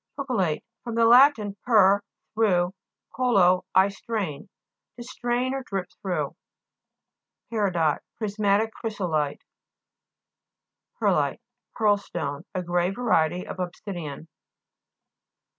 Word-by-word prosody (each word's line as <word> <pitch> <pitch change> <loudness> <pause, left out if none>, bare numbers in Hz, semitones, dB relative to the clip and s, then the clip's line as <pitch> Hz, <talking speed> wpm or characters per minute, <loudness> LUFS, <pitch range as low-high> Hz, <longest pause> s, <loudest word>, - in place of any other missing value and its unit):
PERCOLATE 215 - -1 0.2
fr. 235 - -5
lat. 255 +5 +7 0.3
per, 200 -4 +5 0.3
through, 190 -5 +2 0.4
co/o, 195 -8 +3
I 190 +1 +6
strain. 200 -7 -4 0.5
To 240 - -8
strain 245 +1 -2
or 270 - -2
drip 195 -7 -4
through. 185 -3 -2 1.2
PE'RIDOT 175 -9 +1 0.2
Prismatic 210 0 +1
chrysolite 170 -10 -2 1.6
(p. - - -2
121). - - +2
PE'RLITE - - -51 0.3
Pearlstone, 200 -9 0
a 185 - -1
gray 175 0 +1
variety 180 -6 +1
of - - -8
obsidian. 175 -4 -6
200 Hz, 95 wpm, -25 LUFS, 175-230 Hz, 1.6 s, lat